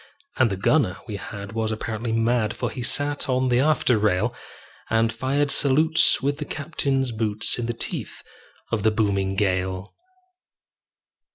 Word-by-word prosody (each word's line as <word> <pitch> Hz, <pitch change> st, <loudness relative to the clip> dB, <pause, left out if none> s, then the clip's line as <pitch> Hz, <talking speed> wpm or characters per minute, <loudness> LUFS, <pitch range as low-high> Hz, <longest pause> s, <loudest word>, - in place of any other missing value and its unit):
And 130 Hz, -3 st, +4 dB
the 95 Hz, -, -3 dB
gunner 105 Hz, -2 st, +2 dB
we 105 Hz, -3 st, -4 dB
had 100 Hz, +1 st, -8 dB
was 110 Hz, -1 st, -1 dB
apparently 110 Hz, +1 st, -3 dB
mad, 115 Hz, -1 st, +1 dB
For -, -, -3 dB
he 130 Hz, -, -6 dB
sat 145 Hz, +3 st, +1 dB
on 130 Hz, 0 st, +1 dB
the 120 Hz, 0 st, +3 dB
after 135 Hz, -5 st, +2 dB
rail, 105 Hz, +3 st, +1 dB, 0.6 s
And 115 Hz, 0 st, +2 dB
fired 140 Hz, +4 st, 0 dB
salutes 155 Hz, +2 st, +3 dB
with 140 Hz, +1 st, 0 dB
the -, -, -3 dB
captain's 140 Hz, -4 st, -1 dB
boots, 110 Hz, 0 st, 0 dB
In 120 Hz, -, -2 dB
the 120 Hz, -, -1 dB
teeth 115 Hz, -, -5 dB, 0.5 s
of 115 Hz, -, 0 dB
the 110 Hz, -, +4 dB
booming 100 Hz, -3 st, 0 dB
gale. 95 Hz, -1 st, -1 dB
115 Hz, 155 wpm, -24 LUFS, 105-135 Hz, 0.6 s, And